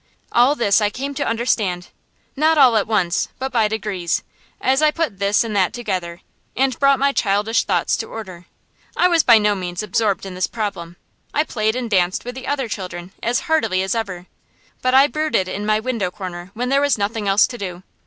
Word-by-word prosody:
All 245 Hz, +5 st, +4 dB
this 225 Hz, -5 st, +3 dB
I 210 Hz, -, +2 dB
came 275 Hz, +6 st, -5 dB
to 285 Hz, -, -2 dB
understand, 210 Hz, -6 st, -1 dB, 0.5 s
not 310 Hz, +3 st, +3 dB
all 260 Hz, -5 st, +6 dB
at 210 Hz, -, +2 dB
once, 195 Hz, -5 st, +1 dB
but 265 Hz, +1 st, -4 dB
by 225 Hz, -3 st, +2 dB
degrees, 210 Hz, -5 st, -2 dB, 0.4 s
as 265 Hz, +2 st, +2 dB
I 305 Hz, -, +5 dB
put 300 Hz, -, -2 dB
this 200 Hz, +3 st, +2 dB
and 220 Hz, -2 st, -4 dB
that 190 Hz, -2 st, +2 dB
together, 185 Hz, -7 st, -4 dB, 0.4 s
and 260 Hz, -1 st, +1 dB
brought 275 Hz, -1 st, +4 dB
my 280 Hz, +2 st, +2 dB
childish 210 Hz, -1 st, +1 dB
thoughts -, -, +1 dB
to -, -, -5 dB
order. 185 Hz, -6 st, -9 dB, 0.5 s
I 360 Hz, -, +5 dB
was 340 Hz, -2 st, +4 dB
by 235 Hz, -6 st, +6 dB
no 210 Hz, -1 st, +2 dB
means 180 Hz, 0 st, -4 dB
absorbed 205 Hz, -1 st, 0 dB
in 190 Hz, -, -7 dB
this 185 Hz, 0 st, -1 dB
problem. 190 Hz, -6 st, -5 dB, 0.4 s
I 300 Hz, -, +3 dB
played 220 Hz, -6 st, -1 dB
and 250 Hz, -1 st, -3 dB
danced 185 Hz, -2 st, +1 dB
with 245 Hz, -, -5 dB
the 260 Hz, 0 st, -8 dB
other 280 Hz, -3 st, -1 dB
children 180 Hz, -3 st, -6 dB
as 240 Hz, +2 st, 0 dB
heartily 225 Hz, -, +1 dB
as 190 Hz, -, -1 dB
ever, 190 Hz, -6 st, -4 dB, 0.6 s
but 255 Hz, 0 st, +2 dB
I 270 Hz, +1 st, +8 dB
brooded 300 Hz, -8 st, 0 dB
in 205 Hz, +3 st, -4 dB
my 215 Hz, 0 st, +3 dB
window 225 Hz, -5 st, -2 dB
corner 180 Hz, -2 st, -7 dB
when 245 Hz, +2 st, -2 dB
there 275 Hz, +1 st, +3 dB
was 285 Hz, -3 st, +2 dB
nothing 205 Hz, +1 st, -2 dB
else 195 Hz, +2 st, +5 dB
to 240 Hz, -, -8 dB
do. 180 Hz, -2 st, -6 dB
215 Hz, 205 wpm, -20 LUFS, 190-255 Hz, 0.6 s, I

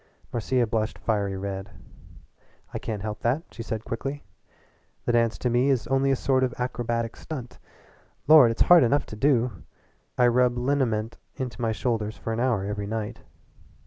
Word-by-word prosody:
Marcia 120 Hz, +1 st, +1 dB
blushed 110 Hz, 0 st, -2 dB
fiery 100 Hz, -3 st, -1 dB
red. 95 Hz, 0 st, -5 dB, 1.0 s
"I -, -, -3 dB
can't 105 Hz, -4 st, -5 dB
help 105 Hz, 0 st, -4 dB
that," 130 Hz, +8 st, 0 dB
she 115 Hz, -, -8 dB
said 110 Hz, -1 st, -4 dB
quickly. 135 Hz, +5 st, -4 dB, 0.8 s
"The -, -, +2 dB
dance 115 Hz, -1 st, +2 dB
to -, -, -2 dB
me 125 Hz, +3 st, +3 dB
is 130 Hz, -4 st, +1 dB
only 135 Hz, +1 st, +1 dB
a 135 Hz, -, +3 dB
sort 130 Hz, 0 st, +1 dB
of 125 Hz, -1 st, -1 dB
acrobatic 120 Hz, -2 st, -2 dB
stunt. 130 Hz, -6 st, -8 dB, 0.7 s
Lord, 150 Hz, -5 st, +8 dB
it's 115 Hz, -, +2 dB
hard 175 Hz, -1 st, +7 dB
enough 135 Hz, +4 st, +2 dB
to -, -, -9 dB
do! 120 Hz, -, +1 dB, 0.6 s
I 125 Hz, -, +5 dB
rub 120 Hz, 0 st, +3 dB
liniment 120 Hz, -4 st, 0 dB, 0.2 s
into 125 Hz, -2 st, -5 dB
my 115 Hz, -1 st, +1 dB
shoulders 110 Hz, -2 st, -2 dB
for 115 Hz, -, -4 dB
an 110 Hz, -, -2 dB
hour 120 Hz, -6 st, +1 dB
every 100 Hz, 0 st, -3 dB
night." 110 Hz, +1 st, -4 dB
120 Hz, 170 wpm, -26 LUFS, 110-130 Hz, 1.0 s, Lord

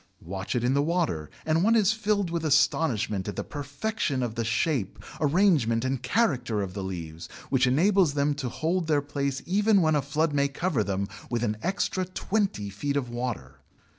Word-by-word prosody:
Watch 95 Hz, +5 st, -4 dB
it 120 Hz, -, 0 dB
in 125 Hz, +2 st, +2 dB
the 140 Hz, -, +3 dB
water 155 Hz, -, -1 dB, 0.2 s
and 160 Hz, +2 st, +2 dB
one 225 Hz, +3 st, +4 dB
is 215 Hz, -3 st, +4 dB
filled 205 Hz, -4 st, 0 dB
with 170 Hz, -1 st, -2 dB
astonishment 140 Hz, -9 st, +2 dB
at 105 Hz, -, -4 dB
the -, -, -3 dB
perfection 145 Hz, -, -3 dB
of 120 Hz, -3 st, -2 dB
the 115 Hz, 0 st, -2 dB
shape, 120 Hz, -, 0 dB, 0.2 s
arrangement, 145 Hz, -, +3 dB
and 130 Hz, -1 st, -1 dB
character 125 Hz, -, +1 dB
of 95 Hz, -2 st, -6 dB
the 100 Hz, -1 st, -4 dB
leaves, 85 Hz, -3 st, -6 dB, 0.2 s
which 130 Hz, -1 st, +3 dB
enables 170 Hz, +3 st, +3 dB
them 145 Hz, +1 st, +2 dB
to 140 Hz, -3 st, -4 dB
hold 165 Hz, +6 st, -1 dB
their 150 Hz, -3 st, +2 dB
place 140 Hz, -2 st, -2 dB
even 205 Hz, +3 st, +3 dB
when 155 Hz, -3 st, +3 dB
a 150 Hz, -, +2 dB
flood 150 Hz, +3 st, 0 dB
may 140 Hz, 0 st, +2 dB
cover 140 Hz, -, -1 dB
them 100 Hz, 0 st, -2 dB, 0.2 s
with 120 Hz, -1 st, -1 dB
an 110 Hz, -2 st, 0 dB
extra 185 Hz, 0 st, -1 dB
twenty 185 Hz, -, -1 dB
feet 140 Hz, +9 st, -2 dB
of 125 Hz, -4 st, -2 dB
water! 115 Hz, -, -4 dB
140 Hz, 190 wpm, -27 LUFS, 115-170 Hz, 0.2 s, one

